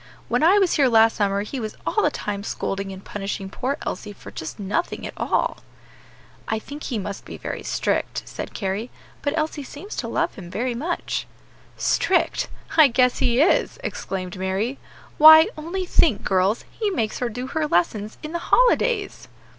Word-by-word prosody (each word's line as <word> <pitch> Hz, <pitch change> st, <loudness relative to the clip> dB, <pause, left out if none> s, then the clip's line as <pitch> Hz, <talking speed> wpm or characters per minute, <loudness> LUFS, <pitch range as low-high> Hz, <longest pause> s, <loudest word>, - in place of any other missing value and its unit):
When -, -, +1 dB
I 350 Hz, +6 st, +6 dB
was 385 Hz, -4 st, +3 dB
here 280 Hz, -3 st, +5 dB
last 225 Hz, -1 st, +5 dB
summer 200 Hz, -1 st, +1 dB
he 255 Hz, +5 st, -5 dB
was 215 Hz, -2 st, -5 dB
all 430 Hz, -, +1 dB
the 300 Hz, -, +3 dB
time 205 Hz, -8 st, -4 dB
scolding 195 Hz, -2 st, -3 dB
and 190 Hz, 0 st, -10 dB
punishing 195 Hz, -1 st, -5 dB
poor 265 Hz, +7 st, -2 dB
Elsie 205 Hz, +3 st, -4 dB
for -, -, -12 dB
just 160 Hz, -, -6 dB
nothing 205 Hz, -, -2 dB
at -, -, -6 dB
all." -, -, 0 dB, 0.9 s
"I 220 Hz, -, 0 dB
think 285 Hz, +7 st, -8 dB
he 245 Hz, -, -2 dB
must 200 Hz, -1 st, -5 dB
be -, -, -9 dB
very -, -, -5 dB
strict," -, -, -1 dB
said -, -, -7 dB
Carry; 200 Hz, +3 st, -2 dB, 0.3 s
"but 290 Hz, +2 st, -1 dB
Elsie 310 Hz, -1 st, -1 dB
seems 295 Hz, +9 st, -8 dB
to -, -, -2 dB
love -, -, 0 dB
him 185 Hz, -7 st, -10 dB
very 240 Hz, +6 st, -2 dB
much." 320 Hz, +9 st, -3 dB, 0.5 s
"Strict! -, -, +1 dB, 0.3 s
I 310 Hz, -2 st, +9 dB
guess 250 Hz, 0 st, +2 dB
he 245 Hz, +2 st, +3 dB
is!" 325 Hz, -, +3 dB
exclaimed 185 Hz, -, -4 dB
Mary; 190 Hz, +8 st, -2 dB, 0.4 s
"why, 315 Hz, +1 st, +10 dB
only 345 Hz, +5 st, -4 dB
think, 325 Hz, -, +3 dB
girls, 190 Hz, +3 st, +1 dB
he 430 Hz, -2 st, -1 dB
makes 225 Hz, -, -2 dB
her 245 Hz, -, -1 dB
do 245 Hz, +3 st, -5 dB
her 305 Hz, +3 st, -1 dB
lessons 210 Hz, 0 st, 0 dB
in 305 Hz, -, -5 dB
the 340 Hz, -, -2 dB
holidays!" 480 Hz, -4 st, +2 dB
240 Hz, 180 wpm, -23 LUFS, 200-310 Hz, 0.9 s, why